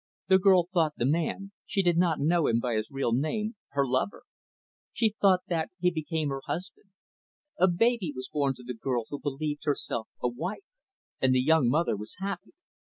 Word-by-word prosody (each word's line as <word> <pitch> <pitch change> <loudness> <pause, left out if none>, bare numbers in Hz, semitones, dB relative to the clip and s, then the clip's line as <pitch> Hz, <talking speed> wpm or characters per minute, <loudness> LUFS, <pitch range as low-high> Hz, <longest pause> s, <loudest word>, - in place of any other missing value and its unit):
The 190 0 +6
girl 185 -3 +5
thought 160 -4 +2
the 120 - 0
man 170 +7 -1 0.2
she 195 - +1
did 175 -2 +3
not 170 -2 +2
know 165 +2 +2
him 115 - +2
by 120 0 -1
his 110 0 -1
real 135 -4 -1
name 210 - -1 0.2
her 140 -1 +2
lover. 130 +9 -1 0.7
She 220 -3 +1
thought 190 -2 +5
that 165 -2 -1
he 180 0 +3
became 160 -2 -2
her 135 0 -3
husband. 185 +3 -5 0.7
A - - +6
baby 195 0 +2
was 130 - -5
born 140 -3 0
to 125 - -13
the 125 +1 -5
girl 120 0 -2
who 145 - -4
believed 145 +1 -3
herself 130 -6 -1
a - - 0
wife; 175 - -4 0.6
and 130 -1 +4
the - - +4
young 155 -4 +4
mother 155 -1 +2
was 105 +2 -7
happy. 195 0 -5
155 Hz, 190 wpm, -28 LUFS, 130-180 Hz, 0.7 s, The